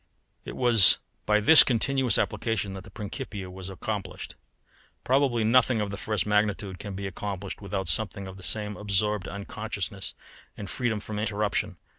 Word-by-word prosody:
It - - -7
was 120 -5 +6 0.3
by 105 0 +4
this 150 +9 +9
continuous 130 +1 +2
application 110 -4 -1
that 95 -1 -8
the - - -13
Principia 105 -3 -6
was 95 0 -8
accomplished. 95 0 -5 0.7
Probably 130 -3 +2
nothing 120 +1 +3
of 105 -1 -2
the - - -4
first 105 -3 -2
magnitude 105 -3 0
can 100 +2 -7
be 100 +1 -5
accomplished 95 +1 -5
without 95 -2 -3
something 100 +3 0
of 95 0 -9
the 95 - -12
same 105 +1 0
absorbed 105 0 -1
unconsciousness 100 0 -4 0.4
and 100 - -6
freedom 115 -3 -2
from 105 0 -5
interruption. 105 -2 -1
105 Hz, 155 wpm, -27 LUFS, 95-110 Hz, 0.7 s, this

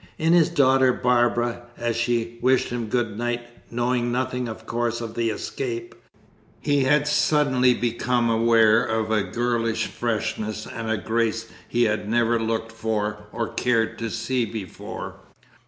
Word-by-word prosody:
In 160 +2 +2
his 170 -3 +5
daughter 130 -1 +4
Barbara, 120 -1 +1 0.2
as 120 -1 -1
she 115 0 -1
wished 130 0 +3
him 120 -2 -3
good 110 -2 -1
night 120 0 -1 0.3
(knowing 120 0 0
nothing, 125 0 -1
of 110 0 -8
course, 120 0 -1
of 115 -2 -6
the 115 0 0
escape), 360 - -4 0.7
he 145 -2 +1
had 145 +2 +3
suddenly 135 -4 +3
become 120 0 0
aware 115 -1 +4
of 110 0 -1
a 110 -1 +3
girlish 115 +2 -1
freshness 110 -2 -3
and 110 -2 -3
grace 115 0 0 0.2
he 120 0 +1
had 105 -2 0
never 120 0 +2
looked 115 0 -2
for 105 -2 -3
or 115 -1 -3
cared 115 -3 +1
to 115 -1 -2
see 120 +3 -1
before. 105 -4 -6
120 Hz, 145 wpm, -24 LUFS, 110-125 Hz, 0.7 s, his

